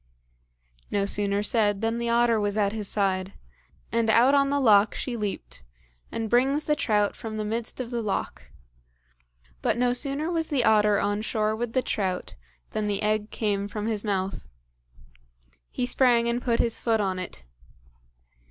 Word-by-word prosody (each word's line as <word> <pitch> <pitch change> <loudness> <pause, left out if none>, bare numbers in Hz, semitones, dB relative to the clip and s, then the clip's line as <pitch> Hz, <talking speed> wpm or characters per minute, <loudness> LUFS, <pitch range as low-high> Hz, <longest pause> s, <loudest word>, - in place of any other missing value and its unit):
No 200 -1 0
sooner 200 0 0
said 210 -2 +1
than 225 +1 -1
the 235 0 -2
otter 235 -1 +3
was 205 0 -1
at 200 -2 +2
his 215 -2 -3
side, 190 -1 -1 0.6
and 230 -1 +1
out 240 +5 +5
on 275 -1 +4
the 285 0 +1
loch 215 -5 +5
she 250 - -3
leaped, 205 - -5 0.5
and 225 -1 -3
brings 265 +6 +2
the 300 - +1
trout 210 -6 +1
from 220 -1 -6
the 215 - -2
midst 225 +3 -3
of 250 -1 -5
the 240 -1 -2
loch; 130 - -4 1.1
but - - +1
no 245 0 +2
sooner 285 +5 -1
was 325 -2 -1
the 275 -5 +1
otter 210 -2 +4
on 205 +1 0
shore 215 -1 0
with 235 +1 -4
the 255 - +1
trout 185 -3 -2 0.4
than 215 -1 -2
the 205 0 -1
egg 215 0 0
came 205 -2 -1
from 210 0 -5
his 220 -2 -2
mouth; 195 -2 -2 1.2
He 250 - -2
sprang 245 -2 +3
and 235 +1 0
he - - -15
put 235 -2 +1
his 230 -1 0
foot 225 -2 +1
on 190 -2 -1
it. 175 - -8
220 Hz, 175 wpm, -26 LUFS, 205-240 Hz, 1.2 s, out